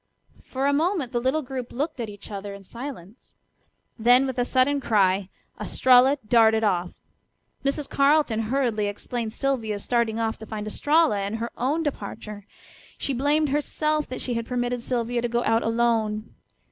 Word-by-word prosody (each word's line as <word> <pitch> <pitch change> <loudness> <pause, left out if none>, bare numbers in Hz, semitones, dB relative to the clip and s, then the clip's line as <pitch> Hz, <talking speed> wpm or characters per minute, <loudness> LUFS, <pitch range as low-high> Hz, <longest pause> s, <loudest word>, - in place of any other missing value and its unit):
For 265 +1 -3
a 285 - +3
moment 315 -3 0
the 240 - -1
little 265 +5 0
group 255 -2 -6
looked 290 +2 -3
at 230 -2 -3
each 205 +1 -11
other 200 0 -6
in 200 - -12
silence. 230 -2 -10 0.6
Then 245 +4 +5
with 260 -2 -3
a 245 - +2
sudden 275 +3 +2
cry 195 -4 +2 0.3
Estralla 260 +2 +4
darted 220 -1 +4
off. 180 -4 0 0.7
Mrs. 280 +1 -1
Carleton 280 -5 +3
hurriedly 235 -6 +1
explained 220 +2 -4
Sylvia's 225 -6 -2
starting 235 -2 0
off 225 -1 -1
to 220 - -9
find 210 -1 -5
Estralla, 295 +1 +2
and 200 +2 -2
her 230 +1 -4
own 290 +7 0
departure. 210 -6 -6 0.5
She 275 - -2
blamed 290 +4 +2
herself 305 +1 0
that 255 - -5
she 250 - -2
had 230 -1 -3
permitted 245 -1 -1
Sylvia 240 0 -1
to 240 - -1
go 240 +1 0
out 225 +1 +2
alone. 225 -2 0
240 Hz, 165 wpm, -25 LUFS, 220-275 Hz, 0.7 s, Then